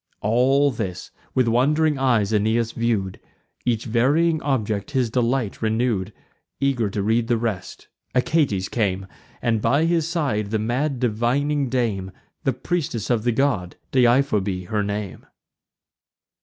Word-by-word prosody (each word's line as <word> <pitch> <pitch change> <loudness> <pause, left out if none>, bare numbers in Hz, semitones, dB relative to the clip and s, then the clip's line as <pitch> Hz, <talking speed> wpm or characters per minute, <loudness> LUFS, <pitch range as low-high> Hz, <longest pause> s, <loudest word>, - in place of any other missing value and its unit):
All 135 +6 +3
this 95 -7 -5 0.2
with 130 -2 +3
wond'ring 145 +5 +2
eyes 115 -6 +2
Aeneas 110 +2 +1
view'd; 110 -6 -1 0.5
Each 115 -2 0
varying 145 +8 +2
object 110 -7 -1
his 130 -6 0
delight 120 -2 0
renew'd: 110 -3 0 0.5
Eager 130 -6 +1
to 100 0 -2
read 115 +2 +1
the 120 - +2
rest, 110 -5 -4 0.3
Achates 125 - +1
came, 95 -4 -1 0.4
And 115 -2 +1
by 140 +8 +2
his 165 -2 +1
side 140 - -1
the 110 - 0
mad 125 +5 -1
divining 130 +5 0
dame, 110 -7 -1 0.3
The 135 - +2
priestess 130 - -2
of 115 -3 +2
the 120 - +3
god, 115 -8 0 0.2
Deiphobe 120 -8 +2
her 105 -1 0
name. 100 -1 -4
120 Hz, 130 wpm, -23 LUFS, 105-135 Hz, 0.5 s, All